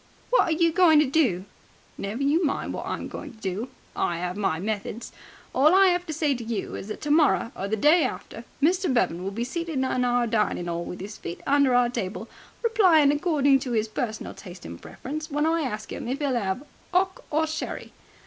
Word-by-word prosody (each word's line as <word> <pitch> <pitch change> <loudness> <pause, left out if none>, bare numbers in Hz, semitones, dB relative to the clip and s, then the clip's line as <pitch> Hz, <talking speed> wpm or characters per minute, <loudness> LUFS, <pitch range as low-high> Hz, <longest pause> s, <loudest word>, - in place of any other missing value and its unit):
"What - - +6
are - - -1
you 335 +1 +3
going 335 -2 +5
to 305 - +4
do?" 255 - +1 0.5
"Never 215 +7 -4
you 305 +6 +3
mind 290 - -1
what - - -5
I'm - - -3
going - - -8
to - - -20
do. 205 +5 -3 0.3
I 170 -1 -1
'ave 180 +3 -3
my 195 -6 +1
methods. 210 +3 -4 0.4
All 300 +7 +5
I 385 -1 +6
'ave 355 0 -2
to 325 - -5
say 305 -2 +1
to 240 -2 -5
you 225 -3 -4
is - - -6
that 215 - -6
tomorrow 295 -5 +3
or 195 - -4
the 215 - 0
day 300 - +5
after 245 -2 -5 0.2
Mr. 360 +1 +3
Bevan 180 -8 +1
will 195 - -2
be 220 +4 -3
seated 335 +6 -4
in 260 - +1
our 245 -1 +1
dining 210 -6 0
'all 170 0 -3
with 180 - -7
'is 210 +2 -8
feet 170 - -7
under 280 -2 +4
our 245 0 +4
table, 220 -1 -4 0.4
replying 365 - +5
according 290 -3 +3
to 255 -2 -4
his 220 -1 +1
personal 220 0 -4
taste 180 -2 -11
and 85 0 -8
preference, 310 +4 -6
when 295 +1 0
I 330 +1 +2
ask 215 -7 -4
'im - - -6
if 265 +4 -2
'e'll 280 -4 0
'ave 220 +4 -2 0.3
'ock 375 +1 +1
or 315 +1 +2
sherry. 315 0 -5
260 Hz, 215 wpm, -25 LUFS, 215-315 Hz, 0.5 s, What